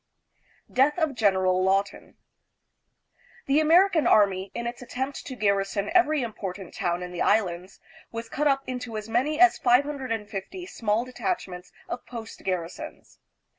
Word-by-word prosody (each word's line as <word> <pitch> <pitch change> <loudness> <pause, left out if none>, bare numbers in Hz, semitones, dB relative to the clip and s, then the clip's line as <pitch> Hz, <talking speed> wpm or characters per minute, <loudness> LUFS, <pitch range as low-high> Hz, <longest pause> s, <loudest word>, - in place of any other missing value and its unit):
Death 275 +5 +3
of 315 -4 +1
General 190 -5 +2
Lawton. 195 +1 0 1.3
The 275 +2 +3
American 335 +1 +4
army, 195 -2 +3
in 235 - -3
its/ 240 +1 -5
attempt 265 +3 -5
to 260 - -6
garrison 200 -1 0
every 310 -6 +3
important 195 -5 -6
town 175 0 -1
in 180 - -7
the 175 - -5
Islands, 185 -4 0 0.3
was 230 0 -5
cut 295 +6 0
up 270 -1 +2
into 250 -3 -5
as 215 0 -6
many 265 +7 0
as 365 0 +6
550 250 - 0
small 225 - -1
detachments 195 - -4 0.2
of 245 - -5
post 230 -2 -9
garrisons. 180 -3 -5
230 Hz, 135 wpm, -26 LUFS, 195-275 Hz, 1.3 s, as